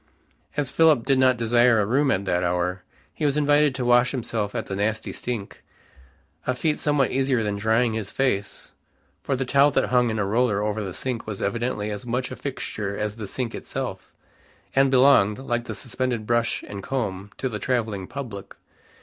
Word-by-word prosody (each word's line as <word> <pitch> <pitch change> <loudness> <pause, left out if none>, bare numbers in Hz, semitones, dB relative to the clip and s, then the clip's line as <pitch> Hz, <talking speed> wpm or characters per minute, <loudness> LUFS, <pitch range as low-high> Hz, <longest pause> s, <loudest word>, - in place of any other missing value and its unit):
As 140 -3 0
Philip 155 -7 +4
did 135 -1 +3
not 130 -1 +4
desire 120 +1 +4
a 105 - +2
room 135 +6 +2
at 100 -6 +1
that 90 -1 0
hour, 90 +1 -1 0.3
he - - -6
was 145 -1 +2
invited 145 -1 +3
to 130 -2 -2
wash 120 +1 +5
himself 110 -5 -3
at - - -2
the 95 - -4
nasty 110 +2 -2
sink, 115 -5 -5 0.9
a 130 - +1
feat 150 +3 0
somewhat 145 -3 +1
easier 130 -3 +1
than 105 -1 -1
drying 110 +2 +2
his 110 -3 -3
face, 115 -7 -2 0.5
for 135 - -1
the 130 +1 -2
towel 140 +3 +5
that - - +1
hung 125 -1 +3
in 110 - -2
a 105 - 0
roller 105 -1 +1
over 105 0 -1
the 95 -3 -5
sink 125 -4 -4
was 105 -3 -5
evidently 105 0 -2
as 105 -1 -5
much 125 +1 -2
a - - -5
fixture 105 -7 -4
as 105 +1 -3
the 105 -3 -6
sink 120 +3 -3
itself, - - -5 0.6
and 135 0 +5
belonged, 130 -6 +5
like 120 -3 -2
the - - -5
suspended 125 -3 -3
brush 120 0 0
and 100 -1 -6
comb, 100 -6 -3
to 130 - -2
the 110 -4 -4
traveling 110 -7 -1
public. 120 -8 -7
120 Hz, 190 wpm, -24 LUFS, 105-130 Hz, 0.9 s, wash